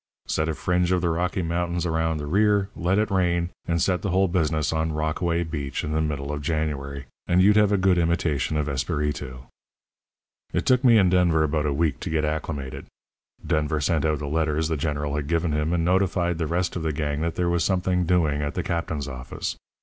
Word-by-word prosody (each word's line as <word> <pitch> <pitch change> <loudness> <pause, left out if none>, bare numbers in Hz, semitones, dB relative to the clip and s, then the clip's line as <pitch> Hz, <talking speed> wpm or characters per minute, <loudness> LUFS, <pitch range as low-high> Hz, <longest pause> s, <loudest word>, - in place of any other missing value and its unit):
Set 80 +1 0
a 80 - -2
fringe 90 +1 0
of 90 - +3
the 85 - +1
Rocky 90 +2 -1
Mountains 85 +1 -1
around 80 -1 0
the 75 - -5
rear, 100 +4 +2
let 90 +3 +1
it 110 0 +1
rain, 85 -2 +1 0.2
and 85 0 +1
set 90 +1 +1
the 100 - -2
whole 95 +2 +3
business 80 -4 0
on 80 0 0
Rockaway 85 +3 0
Beach 75 -5 -4
in 75 - -3
the 80 0 +1
middle 75 -2 -2
of 75 0 -4
January 70 -3 -3 0.2
and 90 +1 +3
you'd 100 +3 +5
have 105 -1 +4
a 100 - +3
good 95 -1 +3
imitation 80 -3 0
of 75 -1 -1
Espiritu. 70 -1 -2 1.1
"It - - 0
took 130 0 +3
me 120 -3 +6
and 95 -4 +4
Denver 85 -4 +3
about 75 0 0
a - - 0
week 70 -1 0
to - - -5
get 80 -1 0
acclimated. 75 -3 -4 0.6
Denver 75 0 0
sent 75 0 +1
out 75 -1 +1
the 75 - -5
letters 80 +1 0
the 80 - 0
General 75 -1 -2
had 75 -1 -3
given 85 0 0
him, 75 +2 0
and 85 -1 +1
notified 90 -2 +1
the 80 - -1
rest 85 +2 -1
of 90 - -2
the 80 -1 -1
gang 75 0 -2
that 85 0 -2
there 90 - 0
was 85 -1 +1
something 90 -2 +1
doing 80 -5 +2
at 75 0 -3
the - - -1
captain's 80 -4 -2
office. 65 -2 -5
80 Hz, 215 wpm, -25 LUFS, 75-90 Hz, 1.1 s, me